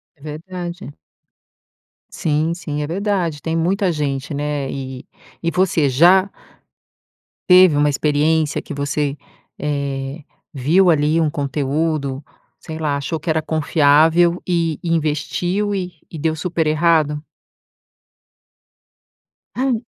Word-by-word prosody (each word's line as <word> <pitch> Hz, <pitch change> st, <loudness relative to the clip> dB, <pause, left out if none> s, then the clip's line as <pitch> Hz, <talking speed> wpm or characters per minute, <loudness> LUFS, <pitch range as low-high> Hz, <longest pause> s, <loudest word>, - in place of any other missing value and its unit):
É 145 Hz, -, -27 dB
verdade. 170 Hz, +2 st, -7 dB, 1.2 s
Sim, 155 Hz, +1 st, -1 dB
sim 150 Hz, -3 st, -4 dB
é -, -, -2 dB
verdade, 180 Hz, -3 st, -1 dB
tem 165 Hz, 0 st, -2 dB
muita 185 Hz, +3 st, +1 dB
gente, 145 Hz, -2 st, -3 dB
né, 145 Hz, -1 st, -2 dB
e 130 Hz, -1 st, -6 dB, 0.4 s
e 170 Hz, -, 0 dB
você 170 Hz, -4 st, +2 dB
já 180 Hz, +9 st, +5 dB, 1.2 s
teve 180 Hz, -4 st, +7 dB
uma 145 Hz, 0 st, +3 dB
experiência 150 Hz, +2 st, +1 dB
que -, -, -7 dB
você, 140 Hz, 0 st, -1 dB, 0.4 s
eh, 140 Hz, 0 st, -3 dB, 0.3 s
viu 165 Hz, +7 st, +3 dB
ali 155 Hz, +1 st, +2 dB
um 155 Hz, -, +1 dB
conteúdo, 140 Hz, 0 st, -2 dB, 0.3 s
sei 160 Hz, -1 st, -8 dB
lá, 150 Hz, -3 st, -1 dB
achou 155 Hz, +3 st, -3 dB
que 165 Hz, +2 st, -3 dB
era 160 Hz, 0 st, +1 dB
confiável 160 Hz, +3 st, +3 dB
e 165 Hz, -4 st, 0 dB
e 170 Hz, -, -3 dB
investiu 175 Hz, +6 st, -1 dB
e 180 Hz, -2 st, -3 dB, 0.2 s
e 160 Hz, -, -7 dB
deu 160 Hz, +1 st, 0 dB
super 165 Hz, -1 st, -1 dB
errado? 155 Hz, -1 st, +2 dB, 2.3 s
Ai, 260 Hz, +1 st, 0 dB
e -, -, -6 dB
155 Hz, 120 wpm, -19 LUFS, 145-170 Hz, 2.3 s, teve